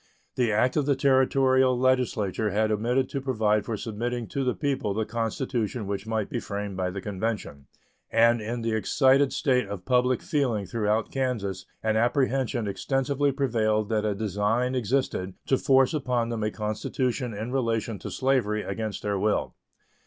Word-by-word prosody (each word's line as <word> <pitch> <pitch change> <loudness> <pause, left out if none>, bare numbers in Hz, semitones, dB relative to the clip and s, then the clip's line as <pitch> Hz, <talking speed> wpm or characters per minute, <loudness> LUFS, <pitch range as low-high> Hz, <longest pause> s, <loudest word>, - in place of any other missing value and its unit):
The 120 -3 +1
act 120 +6 +2
of 145 -2 +1
the 140 - +3
Territorial 130 -1 +3
legislature 120 -5 +1
had 110 +1 +1
omitted 120 +5 +1
to 140 - -3
provide 110 -6 +1
for 110 -1 -3
submitting 120 +2 -3
to 140 - -2
the 125 -1 0
people 135 -9 -1
the 110 0 0
constitution 115 0 -2
which 100 +1 -4
might 110 -2 -1
be 120 - -3
framed 100 -2 -5
by 90 -1 -1
the 95 +1 -5
convention, 100 -9 -4 0.4
and 115 0 +4
in 115 +2 -4
the 115 - 0
excited 135 +5 +3
state 125 -7 +1
of 100 -3 -7
public 125 -1 +2
feeling 125 - 0
throughout 110 0 -1
Kansas 105 -9 -2 0.2
an 110 0 +1
apprehension 125 -1 +1
extensively 135 +6 0
prevailed 110 -6 0
that 110 -2 +1
a 105 -2 0
design 110 +5 0
existed 120 -6 -1
to 135 - +3
force 135 0 +4
upon 125 -5 0
them 115 -2 -3
a 105 - +1
constitution 110 +3 -2
in 110 +4 -4
relation 115 -5 -1
to - - -6
slavery 125 -6 +1
against 110 -2 -4
their 100 -1 -1
will. 105 +1 0
115 Hz, 165 wpm, -26 LUFS, 105-130 Hz, 0.4 s, and